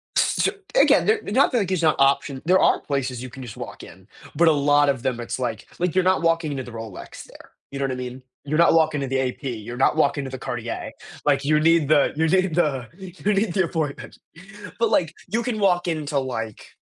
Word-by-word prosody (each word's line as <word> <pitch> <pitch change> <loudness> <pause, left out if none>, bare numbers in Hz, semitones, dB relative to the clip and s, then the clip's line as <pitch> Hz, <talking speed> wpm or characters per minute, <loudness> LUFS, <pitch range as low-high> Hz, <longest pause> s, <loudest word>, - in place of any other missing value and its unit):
S - - +2
so - - +2 0.3
again, - - +5
they're 440 0 +3
not 255 +5 +2
like 200 -6 0
it's 180 -3 0
not 155 -2 +3
option. 135 -1 +2
There 185 +2 +4
are - - +3
places 130 -4 -3
you 130 - -7
can 130 +2 -10
just 120 -4 -9
walk - - -8
in, - - -14 0.3
but 170 +2 +4
a - - +7
lot 145 0 +3
of 130 -4 -1
them, 125 -2 -1
it's 120 +2 -5
like 115 -4 -4
like 180 0 -1
you're 185 - +3
not 185 -2 +2
walking 165 -2 +1
into 135 -2 -4
the 120 - -10
Rolex 115 -4 -9
there, - - -16 0.2
you 140 - -6
know 140 - 0
what 135 - -2
I 130 - -3
mean? 125 0 -7 0.2
You're 150 +2 -1
not 170 0 +5
walking 155 -3 +2
to 135 - -2
the 135 0 -1
AP, 130 -1 -2
you're 120 -2 -5
not 135 - +2
walking 140 -2 +2
to 135 - -6
the 130 - -7
Cartier, 120 -2 -5 0.3
like 140 -1 +2
you 150 +2 +3
need 165 -2 +3
the 150 -2 +4
you 160 +1 +1
need 185 0 +2
the, 140 -8 0
you 190 +1 -3
need 195 -2 0
the 190 -3 +2
appointment, 155 -4 -4 0.6
but, 230 - +2
like, 165 -3 +1
you 225 +6 -1
can 230 -3 -3
walk 180 -2 +2
into 150 -3 -1
like 115 -5 -5
145 Hz, 240 wpm, -23 LUFS, 130-170 Hz, 0.6 s, a